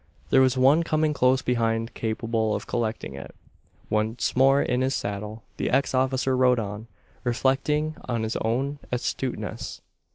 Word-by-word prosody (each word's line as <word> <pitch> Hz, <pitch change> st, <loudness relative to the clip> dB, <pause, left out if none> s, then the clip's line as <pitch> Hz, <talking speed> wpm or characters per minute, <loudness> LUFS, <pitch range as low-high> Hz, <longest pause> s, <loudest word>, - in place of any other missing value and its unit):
There 135 Hz, -, +6 dB
was 130 Hz, 0 st, +3 dB
one 135 Hz, +5 st, +5 dB
coming 155 Hz, -2 st, +1 dB
close 130 Hz, -1 st, +3 dB
behind 115 Hz, -1 st, 0 dB
capable 110 Hz, -1 st, -1 dB
of -, -, -5 dB
collecting 110 Hz, -, -3 dB
it. 70 Hz, +1 st, -9 dB, 0.5 s
Once 110 Hz, +2 st, -1 dB
more 135 Hz, +2 st, +5 dB
in 125 Hz, -2 st, 0 dB
his 130 Hz, +1 st, +1 dB
saddle, 105 Hz, +2 st, -4 dB
the -, -, -1 dB
ex 140 Hz, -, +1 dB
officer 130 Hz, 0 st, +1 dB
rode 125 Hz, -1 st, +4 dB
on 105 Hz, 0 st, -4 dB, 0.4 s
reflecting 135 Hz, +5 st, +1 dB
on 120 Hz, -3 st, -2 dB
his 110 Hz, +1 st, -2 dB
own 135 Hz, +6 st, -1 dB
astuteness. 125 Hz, +1 st, -3 dB
125 Hz, 150 wpm, -25 LUFS, 115-135 Hz, 0.5 s, There